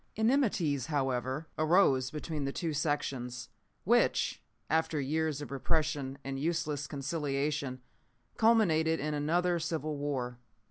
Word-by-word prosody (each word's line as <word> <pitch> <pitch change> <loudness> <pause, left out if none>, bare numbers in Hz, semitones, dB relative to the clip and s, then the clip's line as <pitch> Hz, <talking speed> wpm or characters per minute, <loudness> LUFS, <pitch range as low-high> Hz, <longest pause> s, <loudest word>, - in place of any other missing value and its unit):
Enmities, 210 - +2
however, 135 -1 -1
arose 155 -6 +4
between 150 0 -4
the 135 - -1
two 165 +1 -2
sections, 135 -5 -2 0.3
which, - - +2 0.3
after 160 0 +1
years 150 +1 -1
of 145 - -9
repression 140 -1 -1
and 135 0 -4
useless 155 -2 -1
conciliation, 140 -2 -2 0.6
culminated 165 -9 +4
in 150 +2 -2
another 170 +4 +1
civil 155 -2 -2
war. 130 -4 -3
150 Hz, 110 wpm, -31 LUFS, 135-160 Hz, 0.6 s, arose